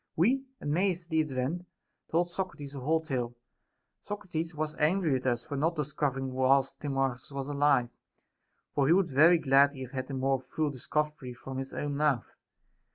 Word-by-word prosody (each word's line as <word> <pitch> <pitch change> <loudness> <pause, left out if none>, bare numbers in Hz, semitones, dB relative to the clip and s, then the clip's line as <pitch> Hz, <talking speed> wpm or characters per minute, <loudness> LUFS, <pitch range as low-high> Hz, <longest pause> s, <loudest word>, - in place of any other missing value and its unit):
We, 255 +11 +3
amazed 175 +4 0
at 170 - -24
the 160 - +3
event, 150 +5 -2 0.4
told 175 +2 +1
Socrates 155 -7 -5
the 140 - -6
whole 160 +5 +1
tale. 130 -7 -2
t 120 - -23 0.7
Socrates 175 -5 -4
was 155 0 -2
angry 165 +2 +2
with 130 0 -1
us 120 -1 0
for 145 - -5
not 160 +5 +1
discovering 140 -3 -1
it - - -7
whilst 130 +1 +2
• - - -38
Timarchns 135 -3 -1
was 140 -1 -4
alive; 145 -4 +3 0.8
for 140 -2 +2
he 160 - +6
would 185 -3 +2
very 160 +6 +7
gladly 140 -2 +4
have 130 -1 -6
had 130 0 -4
a 135 - -3
more 135 0 +1
full 150 +3 -2
discovery 140 -1 -2
from 135 +2 -6
his 135 0 -5
own 145 -1 -3
mouth. 145 -5 +1
145 Hz, 185 wpm, -30 LUFS, 135-160 Hz, 0.8 s, very